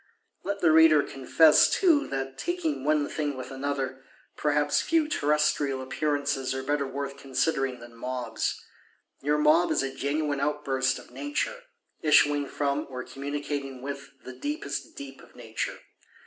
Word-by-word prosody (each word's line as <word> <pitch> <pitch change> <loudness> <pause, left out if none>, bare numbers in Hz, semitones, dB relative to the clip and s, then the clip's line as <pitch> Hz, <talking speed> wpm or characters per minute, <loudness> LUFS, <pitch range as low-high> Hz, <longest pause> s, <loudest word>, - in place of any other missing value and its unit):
Let 200 0 -3
the 165 - +5
Reader 160 -2 +6
confess 150 +4 +5
too 335 -7 +3
that, 135 0 -4
taking 345 - -2
one 150 -1 +2
thing 145 -3 -3
with 130 - -7
another, 135 -1 -3 0.3
perhaps 145 0 +1
few 325 -2 +2
terrestrial 150 - +1
Appearances 140 0 -1
are 130 - -3
better 145 0 0
worth 140 +1 -5
considering 135 -1 -1
than 120 0 -12
mobs. 125 +1 -3 0.6
Your 150 +2 +1
mob 155 +4 +4
is - - +1
a 135 0 -3
genuine 145 0 -1
outburst 135 -3 0
of - - -13
Nature; 295 +12 -3 0.4
issuing 145 -2 +4
from, 140 0 -1
or 125 -1 -5
communicating 140 -1 -5
with, 140 0 -6
the 130 - -8
deepest 140 +2 -4
deep 135 -1 -9
of - - -18
Nature. 115 -2 -4
140 Hz, 145 wpm, -27 LUFS, 135-150 Hz, 0.6 s, Reader